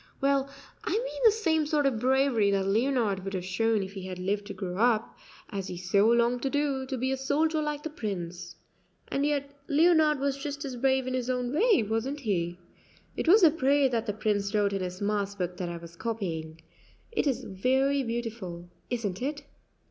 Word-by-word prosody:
"Well, 275 0 +2 0.3
I - - -3
mean - - -2
the 445 - +9
same 325 -8 +1
sort 295 -1 +1
of 260 -5 +1
bravery 260 -4 +3
that 195 -1 +1
Leonard 220 -2 +1
would 195 0 -4
have 180 -1 -3
shown 215 +3 +1
if 190 +1 -8
he 195 - -6
had 185 -1 -5
lived 200 +2 -2
to 200 - -5
grow 185 -1 -4
up, 230 0 +2 0.4
as 195 -2 -4
he 180 - -6
so 195 +4 +3
longed 235 +1 +3
to 270 - 0
do, 280 -2 -1
to 265 -1 -3
be 260 +2 -1
a 265 - 0
soldier 305 +4 +1
like 300 -1 -3
the 315 - -4
Prince. 180 - -5 0.5
And 280 +1 +1
yet 280 -1 -1 0.2
Leonard 315 -1 +4
was 275 0 0
just 285 0 -5
as 265 -2 -5
brave 265 +1 +2
in 255 - -3
his 255 -1 -2
own 250 0 -1
way, 410 - +4
wasn't 225 +7 -2
he? 175 -7 -1 0.6
It - - -3
was 410 +6 +7
the 325 - +8
prayer 280 -2 +3
that 230 -3 -1
the 210 - 0
Prince 205 -1 -1
wrote 205 -1 +2
in 195 - -1
his 180 +1 -5
mass 200 -1 -1
book 180 -2 -3
that 180 -2 -3
I 170 - -5
was 170 0 -11
copying; 170 -6 -4 0.5
it 440 - 0
is 265 - 0
very 265 +8 +1
beautiful, 225 -8 -5 0.2
isn't 215 -6 -3
it?" 285 +2 -3
235 Hz, 205 wpm, -28 LUFS, 195-280 Hz, 0.6 s, the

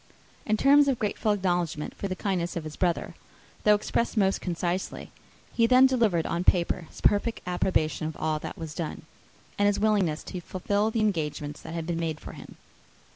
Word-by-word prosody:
In 215 -1 +2
terms 285 +4 +6
of 270 -3 +2
grateful 215 0 0
acknowledgment 175 -6 -1
for 200 - -4
the 185 - -3
kindness 180 -4 -2
of 170 - -3
his 155 -1 -7
brother, 175 -2 -1 0.5
though 210 0 +6
expressed 230 +3 -1
most 195 -2 +2
concisely, 175 +1 -3 0.4
he 230 -1 +3
then 255 +2 +7
delivered 225 -11 +2
on 170 +1 -1
paper 175 -2 +2
his - - -13
perfect 210 +3 +2
approbation 175 -3 0
of 160 - -6
all 155 -1 -1
that - - -7
was 160 -3 -6
done, 165 -1 -5 0.6
and 205 - +4
his 205 - +1
willingness 200 -8 +1
to 180 - -6
fulfil 200 +4 -1
the 225 0 -1
engagements 150 -7 -2
that 165 - -7
had 165 -1 -3
been 170 0 -2
made 160 -2 -2
for - - -9
him. - - -12
185 Hz, 185 wpm, -27 LUFS, 165-210 Hz, 0.6 s, then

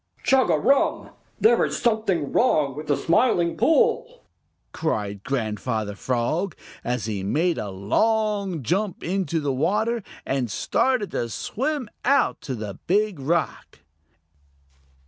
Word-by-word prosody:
"Chugarum! 260 - +2 0.3
There 445 - +5
is - - -1
something 215 - 0
wrong 150 - +2
with 150 +1 -7
the 145 - +2
Smiling 175 -3 +2
Pool!" 470 - +2 0.5
cried 105 -10 -2
Grandfather 110 -4 -2
Frog, 130 - -1 0.3
as 125 -2 -2
he 105 -3 -3
made 160 - 0
a 105 - -4
long 200 - 0
jump 190 - -1
into 175 -3 -1
the 145 -3 -1
water 215 - 0 0.2
and 135 -3 -1
started 235 - 0
to 120 - -2
swim 270 - -3 0.2
out 275 +1 +2
to 130 - -4
the 105 -4 -6
Big 205 -1 +1
Rock. 155 - -2
170 Hz, 120 wpm, -24 LUFS, -, 0.5 s, There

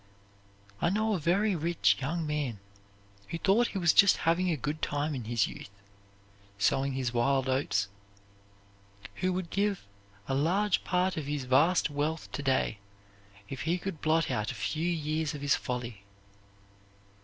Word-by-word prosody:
I 170 - +3
know 215 +3 +1
a 190 - 0
very 195 +6 +2
rich 150 - +2
young 160 +5 -2
man 145 -8 -2 0.7
who 170 - -4
thought 205 +7 +3
he - - -5
was 170 -3 +4
just 200 -2 +6
having 175 +3 +2
a 160 - 0
good 150 +3 -4
time 145 +1 -1
in 125 -5 -5
his 115 -2 +1
youth - - -9 0.9
sowing 135 +7 +1
his 130 -2 -2
wild 130 +2 +2
oats 130 -7 +1 1.3
who 185 0 0
would 180 -2 -3
give 200 - 0 0.4
a - - -1
large 180 +9 +1
part 180 0 0
of 150 -3 -3
his 145 -2 -2
vast 145 +7 +3
wealth 150 +3 -2
to - - -4
day 130 -6 0 0.7
if 135 - -6
he 170 +3 0
could 180 -4 -6
blot 160 -1 +2
out 110 -3 -1
a - - -8
few 160 +3 -1
years 155 -1 -1
of 145 - -7
his 145 -1 +2
folly. 120 -5 -5
155 Hz, 160 wpm, -30 LUFS, 130-175 Hz, 1.3 s, just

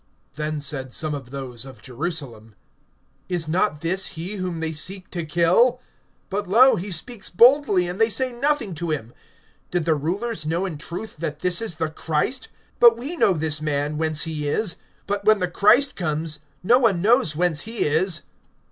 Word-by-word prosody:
(25)Then 155 0 -3
said 135 -2 -3
some 155 -1 -2
of 135 -4 -6
those 130 -3 -6
of 130 -4 -12
Jerusalem: 125 -6 -5 0.7
Is 175 -3 -1
not 155 -2 0
this 185 +3 0
he 185 +6 -5
whom 180 -3 -3
they 160 0 -2
seek 185 +5 -3
to 170 -2 -3
kill? 175 +11 +3 0.5
(26)But, 200 0 -2
lo, 245 +7 +6
he 195 +1 -4
speaks 195 +5 -3
boldly, 235 -4 +5
and 180 +5 -4
they 225 - +5
say 255 +3 0
nothing 260 -4 0
to 170 +1 -4
him. 125 -6 -3 0.6
Did 175 -3 -1
the 165 - +3
rulers 175 +6 -2
know[7:26] 170 +5 -1
in 155 - -7
truth 180 +6 -6
that 150 -1 -4
this 180 +3 +3
is 220 -7 -2
the 160 -1 -2
Christ? 165 - -2 0.3
(27)But 235 -1 +8
we 275 +9 -4
know 200 - +3
this 155 -2 -1
man, 150 0 -1
whence 155 -1 +1
he 155 -3 -3
is; 180 +5 0 0.3
but 200 0 -2
when 215 +1 +5
the 180 -2 -1
Christ 215 +10 +4
comes, 155 -2 -2 0.2
no 240 +7 +5
one 200 -8 +2
knows 225 - +3
whence 170 -2 +2
he 225 +1 -1
is. 160 +4 +1
175 Hz, 185 wpm, -23 LUFS, 155-210 Hz, 0.7 s, 27)But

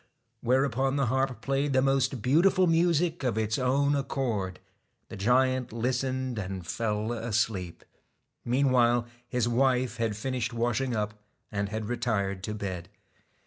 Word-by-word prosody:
whereupon 135 +1 +1
the 140 -1 +2
harp 130 +1 0
played 140 +1 0
the 130 - +4
most 135 -3 +1
beautiful 180 +7 +4
music 170 -1 +2
of 120 -4 0
its 110 +1 0
own 140 +3 +2
accord. 115 -9 -2 0.5
The - - -7
giant 125 +4 +2
listened, 130 +1 -1
and 95 -2 -5
fell 110 +3 -2
asleep. 110 -6 -2 0.6
Meanwhile 120 -2 +3 0.2
his 125 -2 0
wife 125 0 +1
had 115 -3 -1
finished 125 0 -2
washing 120 +2 0
up 105 -1 -1 0.4
and 100 -1 -2
had 110 +1 -3
retired 100 -5 -1
to 105 - -4
bed. 95 -4 -5
125 Hz, 135 wpm, -28 LUFS, 110-135 Hz, 0.6 s, the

